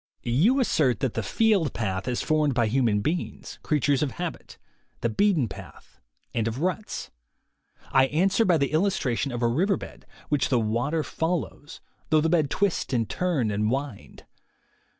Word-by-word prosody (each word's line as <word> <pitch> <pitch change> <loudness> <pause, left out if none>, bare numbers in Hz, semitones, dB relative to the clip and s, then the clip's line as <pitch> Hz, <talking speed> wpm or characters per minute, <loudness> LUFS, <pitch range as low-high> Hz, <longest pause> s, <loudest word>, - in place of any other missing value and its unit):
You 170 - +3
assert 140 - +2
that 130 -4 0
the 115 - -1
field 195 - +2
path 95 -2 -2
is 125 -1 -1
formed 150 -3 +1
by 120 -2 +3
human 110 -3 +1
beings, 165 +10 -4
creatures 145 -3 +1
of 145 -3 -1
habit, 175 -2 -6 0.4
the 115 - +1
beaten 165 - +2
path, 95 - -12 0.3
and 115 -1 0
of 115 +1 -3
ruts. 185 +6 -3 0.8
I 135 0 +5
answer 190 +9 +2
by 180 -5 +3
the 140 -2 0
illustration 155 - 0
of 120 0 -3
a - - +4
river 180 - +1
bed, - - -11 0.2
which 145 -3 +1
the 125 - +3
water 120 +9 0
follows, 160 -2 -4 0.3
though 155 - +4
the 160 +2 +1
bed 160 -4 +2
twist 195 -6 0
and 115 -3 +1
turn 155 -12 0
and 105 +1 0
wind. 135 -3 -5
140 Hz, 165 wpm, -26 LUFS, 120-170 Hz, 0.8 s, I